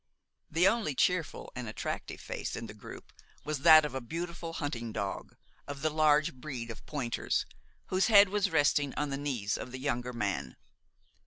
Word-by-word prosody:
The 170 +4 +4
only 215 - +1
cheerful 180 +2 0
and 125 -2 -5
attractive 110 - -5
face - - -5
in 115 - -5
the 105 - -9
group 105 - -11 0.3
was 150 -1 -2
that 155 +1 +8
of 150 - -4
a 130 - -3
beautiful 165 +5 -5
hunting 120 -8 -3
dog, 100 -2 -4 0.3
of 140 0 -7
the 155 - +2
large 150 -1 +3
breed 125 -3 -6
of 115 - -10
pointers, 130 -6 -1 0.4
whose 185 +1 +2
head 205 -3 +8
was 205 0 +1
resting 145 -3 +2
on 145 -1 -2
the 135 - -1
knees 125 -8 -2
of 125 - -7
the 130 - -6
younger 125 -2 -2
man. 100 - -3
145 Hz, 175 wpm, -31 LUFS, 120-160 Hz, 0.4 s, that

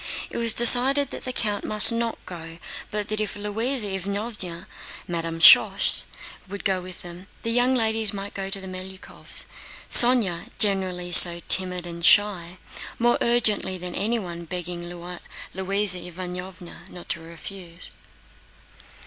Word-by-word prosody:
It - - -8
was 230 -1 +1
decided 255 +4 +4
that - - -11
the 255 - -5
count 210 -5 -5
must 215 +2 +8
not 230 0 -4
go, 165 -2 -11 0.3
but 210 -1 -6
that 215 0 -3
if 210 - -5
Louisa 220 +4 -5
Ivánovna 195 -2 -7 0.4
(Madame 165 -1 -5
Schoss) - - +4 0.4
would 200 +1 -10
go 190 -2 -2
with 180 0 -13
them, 175 +2 -12 0.2
the 230 - -3
young 245 +2 0
ladies 220 -3 -2
might 200 -1 -9
go 195 -1 -7
to 195 0 -6
the 190 - -11
Melyukóvs', 185 0 -8 0.5
Sónya, 235 -9 +4
generally 185 -3 -3
so 170 0 +10
timid 180 -2 +1
and 170 -1 -9
shy, 185 -2 +3 0.4
more 240 +1 -1
urgently 225 -5 -1
than 180 0 -9
anyone 190 -6 -5
begging 175 0 -8
Louisa 185 +2 -7
Ivánovna 180 0 -11
not 175 -2 -14
to - - -3
refuse. 170 +1 -12
190 Hz, 140 wpm, -21 LUFS, 175-215 Hz, 0.5 s, so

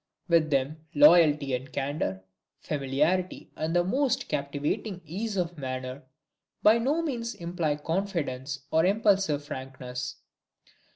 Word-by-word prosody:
With 165 -3 +3
them, 140 +2 0 0.2
loyalty 150 -2 +6
and 130 +1 -3
candor, 135 -10 -2 0.4
familiarity 150 +6 -1
and 160 +2 -2
the 175 - +4
most 260 +8 0
captivating 145 +7 -2
ease 200 +6 -4
of 175 -2 -2
manner, 130 0 -4 0.6
by 220 +2 +6
no 290 +8 +1
means 235 -6 -3
imply 170 -3 -1
confidence, 150 -6 -3
or 160 0 +4
impulsive 195 -6 +2
frankness. 130 -2 -6
155 Hz, 115 wpm, -28 LUFS, 135-185 Hz, 0.6 s, loyalty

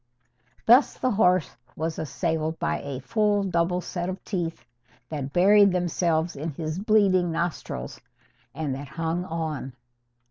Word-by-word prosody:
Thus 245 +5 +6
the 255 - 0
horse 185 -5 +2 0.2
was 160 +1 -3
assailed 160 0 -2
by - - -1
a 140 -2 -5
full 210 - +1
double 180 -1 0
set 175 0 -4
of 190 +1 -6
teeth 170 -5 -4 0.4
that 140 -3 -4
buried 200 +4 +6
themselves 170 -2 0
in 150 +4 -4
his 155 +3 -4
bleeding 195 -4 +3
nostrils, 165 - -4 0.5
and 150 -4 -2
that 140 +2 -6
hung 165 +4 -2
on. 160 -6 -4
170 Hz, 135 wpm, -26 LUFS, 155-185 Hz, 0.5 s, Thus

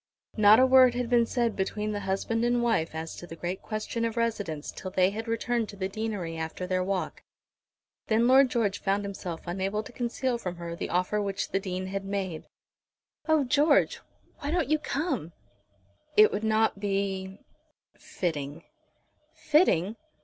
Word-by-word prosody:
Not 215 +1 +7
a 260 - +7
word 260 -1 +6
had 245 -1 -2
been 235 -1 +4
said 235 -3 0
between 210 +2 -2
the 205 - -2
husband 200 +4 -1
and 240 0 +2
wife 170 -10 0
as 160 0 -5
to 175 - -9
the 165 - -8
great 175 +3 -4
question 215 +1 -3
of 230 0 -2
residence 205 -10 -2
till 185 - -7
they 185 0 +2
had 225 +3 -5
returned 230 -1 -1
to - - -9
the 190 -1 -2
deanery 195 -5 -4
after 160 +3 -4
their 185 0 0
walk. 190 0 -3 0.9
Then 225 +2 +3
Lord 265 +1 +6
George 210 -5 0
found 200 +1 0
himself 185 -4 -6
unable 195 +4 -2
to - - -11
conceal 245 +1 -2
from 180 -5 -4
her 170 -1 -6
the - - -4
offer 180 +4 0
which 200 -1 -2
the 195 - 0
Dean 185 -1 -4
had 195 +1 -4
made. 195 -4 -4 0.8
"Oh, 315 -2 +4
George, 285 +3 +3 0.4
why 290 - -4
don't 335 -2 0
you 310 - +3
come?" 280 - -2 0.8
"It 215 0 +8
would 205 - -3
not 220 -1 +2
be 195 -1 -2 0.6
fitting." 150 -2 -4 0.7
"Fitting! 230 - +2
205 Hz, 170 wpm, -28 LUFS, 185-235 Hz, 0.9 s, It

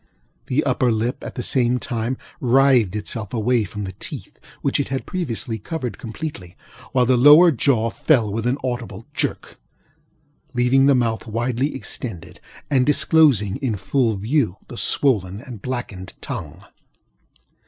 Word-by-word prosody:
The 135 +4 +1
upper 130 -2 +1
lip, 115 +3 -2
at - - -7
the 125 - -3
same 125 -1 +2
time, 120 +1 -3 0.2
writhed 125 -5 +4
itself 105 +2 -4
away 115 0 +1
from 105 +3 -6
the 95 - -5
teeth, 105 - -9 0.3
which 140 - +1
it 140 - 0
had 135 0 -3
previously 120 -10 -3
covered 130 - -5
completely; 110 - -7 0.3
while 125 -1 +3
the 125 0 +3
lower 150 +7 +8
jaw 115 -4 +1
fell 115 -9 +2
with 115 +2 -1
an 130 +3 +1
audible 120 -4 -4
jerk, - - -3 1.0
leaving 125 +3 +4
the 140 - +5
mouth 115 -2 0
widely 120 +5 -1
extended, 110 -9 -6 0.3
and 130 -2 +2
disclosing 145 - +4
in 130 -6 -2
full 110 +4 0
view 110 - 0
the 125 - -8
swollen 105 -7 +1
and 120 -4 -10
blackened 110 -7 -5
tongue. 95 - -7
120 Hz, 145 wpm, -21 LUFS, 110-135 Hz, 1.0 s, lower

